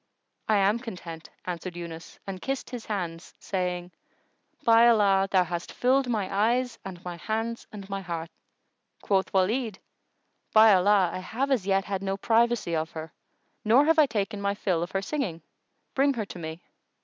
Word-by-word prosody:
"I 215 - +3
am 200 +3 +3
content," 175 -9 -8 0.2
answered 180 0 -5
Yunus 170 -1 -8
and 190 -2 -6
kissed 270 0 -3
his 245 -3 -7
hands, 175 -5 -4
saying, 180 -1 -3 0.7
"By 230 0 +6
Allah, 200 -4 +4
thou 185 -2 +4
hast 175 0 -5
filled 260 +1 +2
my 210 -5 0
eyes 235 +3 +1
and 180 -2 -9
my 175 -1 -5
hands 225 +4 -3
and 200 -2 -9
my 195 -1 -4
heart!" 170 -2 -5 0.7
Quoth 195 -2 +1
Walid, 210 +3 +1 0.8
"By 220 -1 +8
Allah, 190 -1 +4
I - - -3
have 250 +9 -2
as 220 -8 +1
yet 195 0 +2
had 195 -1 -3
no 195 0 -2
privacy 230 -4 +2
of 160 0 -1
her 160 -1 -7 0.5
nor 240 +7 +5
have 325 0 +4
I 300 - +6
taken 205 -3 -2
my 200 0 0
fill 185 -5 0
of 175 - -2
her 195 +1 -2
singing. 200 - -3 0.5
Bring 275 0 +3
her 220 -3 -2
to 185 - -9
me!" 160 +1 -7
195 Hz, 175 wpm, -27 LUFS, 180-230 Hz, 0.8 s, By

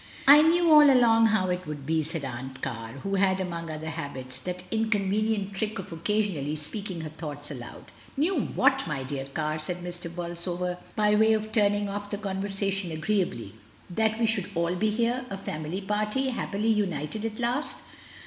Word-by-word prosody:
"I 290 +2 +10
knew 335 +1 +4
all 300 -2 +9
along 230 -3 +5
how 190 -4 +2
it 180 -2 -3
would 145 -2 -6
be," 160 +1 +1
said 155 -1 -3
Aunt 130 +1 -7
Car, 115 -3 -4
who 195 - -2
had, 190 -1 +3
among 170 -3 -4
other 155 0 -5
habits, 130 -3 -6
that 180 0 -6
incon 220 -3 +1
venient 210 -1 0
trick 215 +3 -2
of 195 - -7
occasionally 165 -4 -1
speaking 180 +3 -4
her 155 - -5
thoughts 150 -2 -6
aloud. 120 -4 -9 0.3
"Knew 320 +7 +2
whaty - - +2
my 145 -4 -2
dear 135 0 -4
Car?" 155 +2 -2
said 175 +3 -4
Mr. 175 -1 -4
Bolsover, 175 +1 -3 0.2
by 210 -1 +3
way 220 +1 +5
of 215 0 -1
turning 205 -1 +2
off 205 +1 -5
the 205 - -3
conversation 195 -2 -1
agreeably; 160 - -1 0.4
"that 220 +3 +1
we 235 - +3
should 220 -4 +1
all 170 +1 +1
be 215 +4 +1
here 235 +4 0
— - - -15
a 195 - -4
family 160 0 -4
party, 210 +6 0
hap 245 - -3
pily 215 +2 +2
united 185 -1 -2
at 220 -1 -3
last?" 245 +5 -1
190 Hz, 185 wpm, -27 LUFS, 160-215 Hz, 0.4 s, I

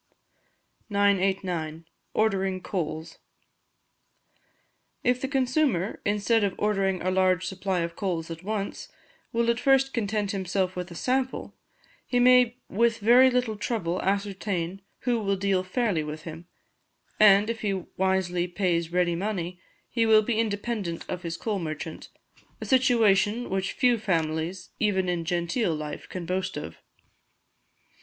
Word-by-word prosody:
989. 190 -5 0 0.3
Ordering 195 -3 +1
Coals. 165 -4 -4 1.8
If 250 0 +2
the 270 - -1
consumer, 255 - 0
instead 210 +2 +2
of 200 -2 0
ordering 195 -3 0
a 185 - +1
large 185 -1 +2
supply 190 -1 -2
of 170 0 -3
coals 170 -5 -3
at 165 0 -7
once, 200 0 -4 0.4
will 230 0 +1
at 235 - -2
first 270 +1 +3
content 210 -2 -1
himself 190 -1 -1
with 180 0 -4
a 170 - -10
sample, 260 +5 -1 0.5
he 245 - 0
may 250 -1 +5
with 230 +2 +2
very 245 +5 +6
little 250 -3 0
trouble 205 -5 -2
ascertain 195 -2 -2 0.2
who 240 -2 +1
will 200 -2 0
deal 195 -1 +1
fairly 185 -3 0
with 155 +1 -6
him; 165 +1 -9 0.7
and, 205 0 +7
if 230 -1 -3
he 205 -2 0 0.2
wisely 185 -2 +1
pays 175 -2 0
ready 175 -1 +2
money, 180 -2 -3 0.3
he 230 -2 +1
will 215 -1 +6
be 225 0 0
independent 205 -5 -2
of 180 - -4
his 165 -1 -4
coal 210 0 -2
merchant; 155 -1 -6 0.5
a - - -6
situation 230 -4 +3
which 190 0 -1
few 245 -2 +3
families, 165 -2 -2
even 190 -4 +1
in 175 -2 -1
genteel 175 +2 0
life, 150 -1 -6
can 180 -2 -5
boast 185 +1 -2
of. - - -7
195 Hz, 135 wpm, -26 LUFS, 175-220 Hz, 1.8 s, and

